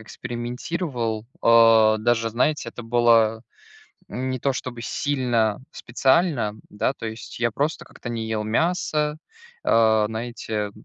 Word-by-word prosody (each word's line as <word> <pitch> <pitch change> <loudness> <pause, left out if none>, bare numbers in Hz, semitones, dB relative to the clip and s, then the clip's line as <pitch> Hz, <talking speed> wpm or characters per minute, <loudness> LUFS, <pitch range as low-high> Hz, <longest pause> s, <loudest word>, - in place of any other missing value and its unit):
экспериментировал, 120 0 -4 0.2
а, 115 -2 +6
даже, 115 0 +1
знаете, 145 +6 0
это 120 - -9
было 115 -1 +3 0.7
не 130 +1 -3
то, 140 - +1
чтобы 125 -2 -6
сильно 120 -6 0
специально, 130 - +1 0.2
да. 105 +6 -1
То 115 - -8
есть 110 +1 -7
я 120 -1 +1
просто 145 +7 -2
как-то 120 - -9
не 115 -1 -3
ел 110 -1 -2
мясо, 150 - 0 0.5
а, 110 -2 +4
знаете, 110 -2 -4
115 Hz, 120 wpm, -23 LUFS, 110-130 Hz, 0.7 s, а